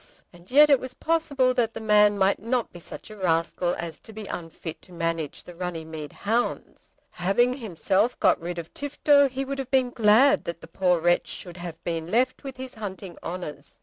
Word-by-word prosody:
And 175 Hz, +1 st, -17 dB
yet 295 Hz, +3 st, +7 dB
it 275 Hz, -, +6 dB
was 255 Hz, 0 st, -7 dB
possible 295 Hz, -6 st, +1 dB
that 235 Hz, -3 st, 0 dB
the -, -, -4 dB
man 210 Hz, -1 st, +4 dB
might 195 Hz, 0 st, +3 dB
not 235 Hz, +2 st, -1 dB
be 175 Hz, -, -9 dB
such 175 Hz, -, -10 dB
a -, -, -9 dB
rascal 175 Hz, -1 st, 0 dB
as 170 Hz, -1 st, -6 dB
to 220 Hz, -, -13 dB
be 215 Hz, -1 st, -8 dB
unfit 165 Hz, -3 st, -7 dB
to -, -, -18 dB
manage 165 Hz, -3 st, -3 dB
the 175 Hz, -, -11 dB
Runnymede 160 Hz, -4 st, -6 dB
hounds. 230 Hz, +4 st, -3 dB, 0.2 s
Having 240 Hz, +8 st, +1 dB
himself 210 Hz, -, 0 dB
got -, -, +3 dB
rid 175 Hz, +1 st, -4 dB
of 170 Hz, -1 st, -7 dB
Tifto, 285 Hz, 0 st, +3 dB
he 265 Hz, +1 st, -3 dB
would 275 Hz, +1 st, -4 dB
have 265 Hz, -2 st, -4 dB
been 260 Hz, -2 st, +2 dB
glad 230 Hz, +5 st, +5 dB
that 170 Hz, 0 st, -4 dB
the -, -, -11 dB
poor 180 Hz, -2 st, +2 dB
wretch 175 Hz, +1 st, +2 dB
should 175 Hz, -1 st, -7 dB
have 170 Hz, -2 st, -8 dB
been 165 Hz, -1 st, -3 dB
left 255 Hz, +7 st, +1 dB
with 270 Hz, -2 st, -7 dB
his 260 Hz, 0 st, -7 dB
hunting 195 Hz, -4 st, -7 dB
honours. 165 Hz, -5 st, -7 dB
205 Hz, 200 wpm, -26 LUFS, 170-255 Hz, 0.2 s, yet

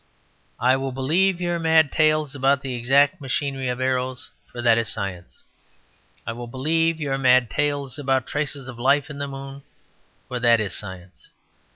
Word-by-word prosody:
"I 130 Hz, +2 st, +3 dB
will 135 Hz, 0 st, -3 dB
believe 170 Hz, +8 st, +1 dB
your 175 Hz, -1 st, -1 dB
mad 160 Hz, -3 st, +4 dB
tales 155 Hz, -2 st, +2 dB
about 140 Hz, 0 st, +2 dB
the 135 Hz, -2 st, -4 dB
exact 140 Hz, +7 st, +2 dB
machinery 135 Hz, -1 st, -2 dB
of 125 Hz, 0 st, -2 dB
arrows; 130 Hz, 0 st, -2 dB, 0.2 s
for 120 Hz, -, -9 dB
that 115 Hz, -1 st, +4 dB
is 115 Hz, -, -2 dB
science. 90 Hz, -3 st, -6 dB, 0.8 s
I 115 Hz, -, -3 dB
will 120 Hz, +1 st, -7 dB
believe 160 Hz, +6 st, 0 dB
your 135 Hz, -3 st, -2 dB
mad 130 Hz, -2 st, +4 dB
tales 145 Hz, -2 st, -1 dB
about 135 Hz, -2 st, 0 dB
traces 145 Hz, -3 st, -3 dB
of 125 Hz, -2 st, -9 dB
life 140 Hz, +4 st, +2 dB
in 140 Hz, -, -8 dB
the 140 Hz, -, -3 dB
moon; 135 Hz, 0 st, -8 dB, 0.7 s
for 125 Hz, -, -4 dB
that 120 Hz, -1 st, +4 dB
is 105 Hz, -4 st, -2 dB
science. 95 Hz, -2 st, -7 dB
135 Hz, 170 wpm, -23 LUFS, 125-145 Hz, 0.8 s, mad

